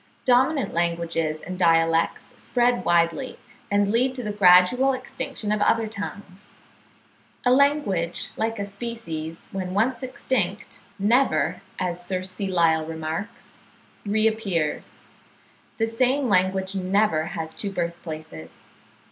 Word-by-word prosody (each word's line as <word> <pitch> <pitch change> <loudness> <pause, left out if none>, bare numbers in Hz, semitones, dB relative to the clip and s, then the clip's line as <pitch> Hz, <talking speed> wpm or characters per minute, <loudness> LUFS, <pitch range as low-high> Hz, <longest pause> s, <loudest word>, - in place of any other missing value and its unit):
Dominant 260 +3 +3
languages 170 -2 -1
and 185 0 -6
dialects 165 -1 +2
spread 245 0 +1
widely, 170 +9 +1 0.3
and 205 0 +2
lead 255 +3 +2
to 250 - -5
the 210 - -2
gradual 205 +7 +5
extinction 255 -4 -4
of 210 -1 0
other 225 +2 +3
tongues. 200 -2 -9 0.9
A 250 - +5
language, 250 - +1
like 225 +1 -1
a 200 - -2
species, 200 -7 -6
when 185 -1 -4
once 235 +5 +1
extinct, 235 -6 -3
never, 235 +7 +2 0.2
as 175 -2 -3
Sir 185 +1 -3
C. 185 +1 -5
Lyell 165 -3 +3
remarks, 165 +8 -6 0.4
reappears. 210 -6 -1 0.8
The 225 - +2
same 255 +4 +1
language 190 -1 +1
never 190 -3 +1
has 160 0 -4
two 205 - -3
birth 170 -2 -3
places. 155 - -9
195 Hz, 120 wpm, -24 LUFS, 170-230 Hz, 0.9 s, gradual